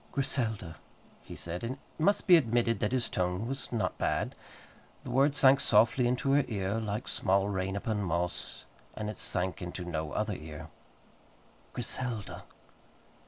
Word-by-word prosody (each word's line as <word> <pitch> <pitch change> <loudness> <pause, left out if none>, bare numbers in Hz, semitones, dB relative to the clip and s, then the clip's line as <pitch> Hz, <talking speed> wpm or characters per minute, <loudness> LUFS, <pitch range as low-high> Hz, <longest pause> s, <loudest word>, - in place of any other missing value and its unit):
"Griselda," 115 -11 -1 0.4
he - - -10
said, 85 +3 -5
and 115 +2 -2
it 135 - -14 0.2
must 200 +6 +2
be 180 - +8
admitted 120 -5 +2
that 105 - 0
his 125 -2 +2
tone 90 +4 -1
was 135 +1 -4
not 115 -3 -1
bad. - - 0 0.7
The - - -6
word 140 +2 +3
sank 135 0 +6
softly 120 +1 +4
into 125 +3 +1
her 145 +1 +5
ear, 100 0 -1
like 110 +1 -3
small 95 0 +2
rain 95 0 -2
upon 105 +1 -1
moss, 90 -1 -2 0.3
and 105 0 -3
it - - -11
sank 95 0 0
into 90 0 -5
no 80 -3 -3
other 105 -1 -1
ear. 80 -1 -8 1.0
"Griselda!" 120 -3 -3
110 Hz, 155 wpm, -30 LUFS, 95-125 Hz, 1.0 s, be